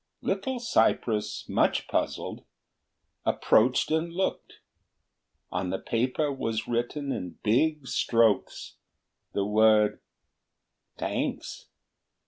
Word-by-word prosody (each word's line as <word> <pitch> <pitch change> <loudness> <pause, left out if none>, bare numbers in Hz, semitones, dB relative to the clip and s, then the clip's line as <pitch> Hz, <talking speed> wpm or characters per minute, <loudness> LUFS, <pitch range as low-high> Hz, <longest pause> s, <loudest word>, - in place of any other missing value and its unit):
Little 205 +7 -1
cypress, 110 - +1
much - - +1
puzzled, - - -2 0.8
approached 125 +6 +3
and 160 +2 0
looked; 190 +3 -2 1.0
on 90 - -2
the 95 - -1
paper 130 +8 -1
was 115 -4 -3
written 120 +4 -2
in 90 -8 -5
big 145 +6 +2
strokes 115 -6 +1 0.6
the 100 - 0
word 105 0 +4 1.0
"Thanks." - - -3
120 Hz, 90 wpm, -27 LUFS, 110-155 Hz, 1.0 s, word